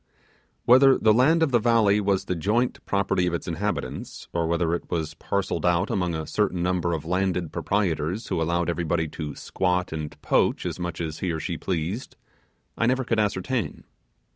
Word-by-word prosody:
Whether 130 +2 +7
the 110 -1 +4
land 155 +8 +4
of 150 - +1
the 120 - +4
valley 110 -3 +3
was 100 -1 +1
the - - -1
joint 105 +9 0
property 100 -2 +1
of 85 - 0
its - - -5
inhabitants, 100 +5 -4
or 85 -1 0
whether 85 0 +1
it 85 - -4
was 80 -3 -2
parcelled 100 -1 -2
out 90 +2 +2
among 90 -3 0
a 80 -1 -3
certain 95 -3 0
number 90 -1 0
of 80 -2 -3
landed 90 -1 0
proprietors 95 0 -1
who 80 - 0
allowed 85 +1 0
everybody 85 -1 0
to 75 -1 -6
'squat' 90 -1 -1
and 75 -1 -6
'poach' - - +2
as - - -3
much 85 -2 -4
as 80 -2 -4
he 95 - -2
or 80 - -2
she - - -3
pleased, 90 +6 -3 0.6
I 115 - +1
never 130 +1 +2
could 115 -3 0
ascertain. 105 - -1
90 Hz, 185 wpm, -25 LUFS, 85-105 Hz, 0.6 s, Whether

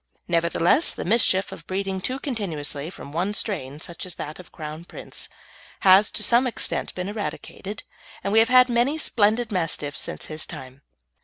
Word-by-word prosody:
Nevertheless, 170 - +3
the - - -4
mischief 195 -1 +3
of 165 - -10
breeding 190 0 -2
too 255 +7 -2
continuously 170 - -3
from 140 -5 -10
one 185 +7 -1
strain 150 - -2
such 170 +1 -6
as 180 -2 -5
that 150 +3 -6
of 180 - -12
Crown 155 0 -7
Prince - - -5 0.5
has 195 +2 +7
to 215 - 0
some 240 +4 +4
extent 240 - -1
been 180 0 -3
eradicated, 205 -1 -5 0.4
and 200 - -1
we 220 - +7
have 225 +1 +4
had 255 0 +7
many 245 +5 +2
splendid 225 -4 +2
Mastiffs 165 -6 -1
since - - -3
his 155 0 -2
time. 130 +1 -9
190 Hz, 170 wpm, -24 LUFS, 165-225 Hz, 0.5 s, has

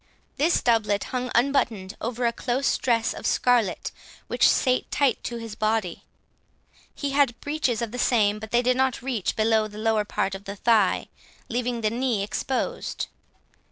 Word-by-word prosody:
This 315 +5 +2
doublet 215 -4 +2
hung 250 0 -1
unbuttoned 235 -7 +1
over 240 +1 -2
a 235 - +2
close 255 +3 0
dress 230 -3 +1
of - - -4
scarlet 240 -7 +1 0.3
which - - +3
sat 255 -2 +1
tight 275 -5 +1
to 240 - -3
his 230 -2 -7
body; 215 -5 -1 0.9
he 285 -2 -3
had 275 -4 +2
breeches 285 -6 -1
of 230 - -4
the 250 - -5
same, 215 -4 +2
but 220 0 -8
they 240 +2 +2
did 250 +1 +2
not 260 -2 +1
reach 245 -7 -1
below 220 0 +2
the 210 0 -12
lower 220 -1 +1
part 195 -2 -2
of 195 +1 -7
the 200 - -6
thigh, 215 -2 +2 0.4
leaving 240 0 -1
the 215 -1 +1
knee 235 -4 0
exposed. 250 +5 -3
235 Hz, 165 wpm, -25 LUFS, 215-250 Hz, 0.9 s, which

